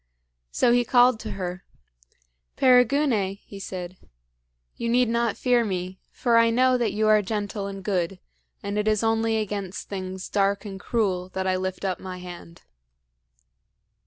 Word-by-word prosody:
So 240 - +2
he 245 0 +4
called 245 -1 +4
to 220 - -6
her: 180 -1 -5 0.9
"Perigune," 250 -5 +3
he 200 - -10
said, 185 -1 -6 0.8
"you 235 - -3
need 245 +1 +3
not 235 0 0
fear 245 -2 +3
me; 185 -2 -4
for 235 -2 +2
I 230 0 +5
know 255 +2 +3
that 240 -2 +1
you 215 +1 0
are 215 0 +5
gentle 205 0 -3
and 195 -1 -7
good, 185 -2 -1 0.4
and 200 +1 -2
it 210 - -1
is 215 0 +2
only 225 0 +1
against 200 -3 -4
things 185 -1 -5
dark 200 +1 0
and 195 -2 -7
cruel 185 -4 -1
that 190 0 -1
I 185 0 +1
lift 185 +1 -3
up 185 -2 -1
my 185 -1 -7
hand." 175 -2 -11
205 Hz, 160 wpm, -25 LUFS, 185-230 Hz, 0.9 s, I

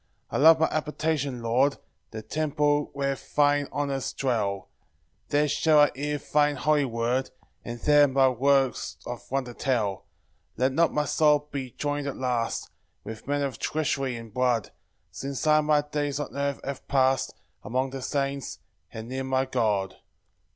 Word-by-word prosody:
4 - - -1
I - - +1
love 160 +2 +8
thy 160 - +3
habitation, 150 -4 -2
Lord, 130 +5 +2 0.3
The 110 -1 -7
temple 150 0 0
where 140 0 0 0.2
thine 145 -1 +3
honours 140 -2 -2
dwell; 105 -7 -1 0.6
There 150 0 +2
shall 150 +2 +3
I 145 0 +6
hear 145 +3 -2
thine 145 +1 +1
holy 150 +1 +2
word, 120 +2 -1 0.3
And 120 0 -6
there 145 -1 +5
thy 135 0 +4
works 135 +1 +1
of 120 -1 -7
wonder 130 -2 -2
tell. 115 -8 0
5 - - -27 0.5
Let 130 +3 +2
not 165 +5 +2
my 150 0 0
soul 150 -1 +3
be 135 -2 -4
join'd 145 -1 -2
at 140 - -4
last 125 -3 -2 0.3
With 110 +2 -9
men 145 0 0
of 130 -6 -3
treachery 135 -4 -1
and 115 -2 -9
blood, 125 -4 +1 0.4
Since 140 +1 -5
I 155 0 +5
my 150 -1 +3
days 145 -1 -3
on 145 - -5
earth 140 -1 -1
have 140 -1 -6
past 135 -1 +2 0.3
Among 130 +4 -1
the 135 0 -6
saints, 140 0 -2 0.3
and 110 0 -7
near 130 +2 -3
my 130 0 0
God. 105 -7 0
140 Hz, 165 wpm, -26 LUFS, 125-145 Hz, 0.6 s, love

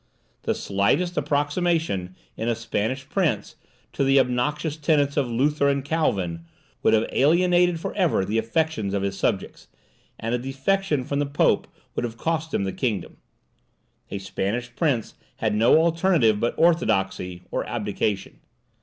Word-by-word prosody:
The - - -1
slightest 110 - 0
approximation, 145 - 0 0.2
in 115 - -3
a 120 - +1
Spanish 115 +3 -2
prince, 150 - -1 0.4
to - - 0
the 135 0 +5
obnoxious 135 +5 0
tenets 145 -2 +1
of 135 -4 +1
Luther 140 +4 +2
and 140 -1 0
Calvin, 95 - -1 0.4
would - - +4
have 110 +1 +2
alienated 175 +3 +3
for - - -4
ever 175 - +1
the 110 +3 0
affections 115 -4 -1
of 100 - -1
his 100 0 -2
subjects, - - -2 0.5
and 115 +1 -2
a 125 - +1
defection 140 +4 0
from 140 +3 -2
the 145 - 0
Pope 140 +1 +2 0.3
would - - -2
have 115 -1 -4
cost 160 +1 -2
him - - 0
the 95 - -2
kingdom. 110 -9 -2 0.9
A - - -4
Spanish 110 +5 -3
prince 135 -9 0 0.2
had 110 -1 -1
no 110 +7 +5
alternative 165 - +3
but 120 - 0
orthodoxy 95 - +1
or - - -1
abdication. 100 -2 -2
135 Hz, 150 wpm, -24 LUFS, 110-160 Hz, 0.9 s, the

